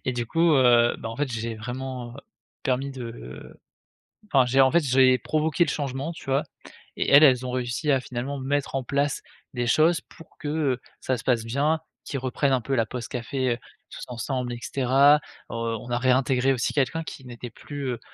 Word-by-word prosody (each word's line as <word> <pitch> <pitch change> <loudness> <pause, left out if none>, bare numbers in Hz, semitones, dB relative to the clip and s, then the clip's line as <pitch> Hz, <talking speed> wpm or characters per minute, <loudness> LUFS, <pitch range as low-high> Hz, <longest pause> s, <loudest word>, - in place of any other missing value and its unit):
et 130 - 0
du 120 -1 -2
coup, 165 +6 +3
heu, 120 -3 +5
bah, 115 - -5
en 115 - -7
fait, 140 -4 -2
j'ai 115 0 -3
vraiment 125 +1 -6 0.5
permis 135 +1 -1
de 115 - -9 0.7
enfin, 130 -3 +5
j'ai 130 +2 +3
en 130 -1 +5
fait, 170 - +5
j'ai 130 -1 +5
provoqué 155 +7 +1
le 150 - -2
changement, 140 +1 -3
tu 160 - -12
vois? 135 +2 +1 0.5
Et - - -1
elles, 140 +2 +8
elles 130 -3 +4
ont - - -3
réussi 125 +4 -1
à 135 - +3
finalement 130 +3 -5
mettre 140 +1 -2
en 135 - 0
place 140 +2 -1 0.3
des 120 -1 -1
choses 160 +7 +4
pour 165 - -17
que, 150 - -5
heu, 145 -4 0 0.2
ça 130 - -1
se - - -10
passe 120 -3 +1
bien, 145 +7 +1 0.2
qu'ils 140 - -4
reprennent 130 +2 0
un 130 - +2
peu 135 +4 -2
la 115 -3 +2
pause 120 0 -6
café, 130 +1 -2
heu, 120 - -8 0.3
tous - - -8
ensemble, 125 +1 -3
et 120 - -5
cetera. 135 +3 +4 0.4
Heu, - - -5
on 115 0 -3
a 120 - +1
réintégré 130 +1 +2
aussi 125 -2 -1
quelqu'un 150 +3 0
qui 145 -4 -9
n'était 120 0 -8
plus, 145 +5 -7
heu, 120 - -6
130 Hz, 205 wpm, -25 LUFS, 120-140 Hz, 0.7 s, elles